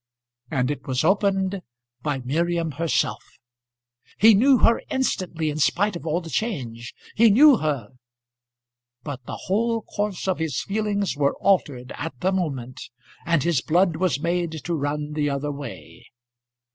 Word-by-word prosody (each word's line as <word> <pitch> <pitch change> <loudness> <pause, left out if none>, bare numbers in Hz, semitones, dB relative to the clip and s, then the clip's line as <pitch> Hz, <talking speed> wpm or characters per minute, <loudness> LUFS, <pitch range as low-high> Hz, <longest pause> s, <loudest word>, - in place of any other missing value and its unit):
And 125 +1 0
it 145 - -6
was 130 +1 0
opened 195 +1 +1 0.4
by 145 -1 -1
Miriam 165 +5 -1
herself. 165 +3 -1 0.9
He 220 +2 +7
knew 260 +6 +5
her 230 - +3
instantly 180 - -1
in 150 - -5
spite 195 +8 +2
of 170 - -7
all 165 +3 0
the 165 - -9
change. 125 - -3 0.2
He 230 +1 +5
knew 270 +5 +7
her, 140 - -2 1.1
but 140 -4 -6
the - - -5
whole 225 +3 0
course 205 -2 -3
of 190 - 0
his 160 -5 -1
feelings 205 -2 -1
were 140 -1 +1
altered 140 -10 0
at 145 -4 -6
the 185 - +1
moment, 135 -10 -3 0.5
and 170 -4 +2
his 165 -5 +1
blood 175 0 +2
was 175 -6 0
made 170 +1 -1
to 175 - -2
run 150 0 -2
the 150 -1 0
other 140 +1 -2
way. 140 -4 -9
165 Hz, 150 wpm, -24 LUFS, 145-195 Hz, 1.1 s, He